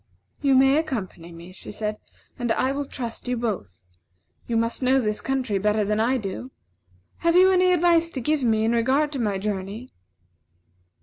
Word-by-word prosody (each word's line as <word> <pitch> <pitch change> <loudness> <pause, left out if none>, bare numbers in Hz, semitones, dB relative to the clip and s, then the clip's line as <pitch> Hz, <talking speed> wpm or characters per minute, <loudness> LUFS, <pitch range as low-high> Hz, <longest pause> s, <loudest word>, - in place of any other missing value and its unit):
"You 275 -2 +3
may 270 +2 +5
accompany 210 - -4
me," 170 +2 -11
she 185 - -12
said, 210 0 -4 0.4
"and 240 -1 -1
I 260 - 0
will 285 +1 -3
trust 240 -3 -6
you 250 0 -1
both. 195 - -4 0.7
You 230 - 0
must 230 +2 -1
know 260 +1 +3
this 215 -4 -1
country 255 -7 -1
better 210 +1 +1
than 210 +1 0
I 245 +4 +2
do. 215 +3 -5 0.7
Have 335 0 +1
you 375 +1 +6
any 365 0 +4
advice 340 -1 +3
to - - -1
give 300 +4 0
me 220 -2 +2
in 225 - +2
regard 260 +6 +2
to 280 - -4
my 205 -4 0
journey?" 205 +4 -5
235 Hz, 180 wpm, -24 LUFS, 210-275 Hz, 0.7 s, you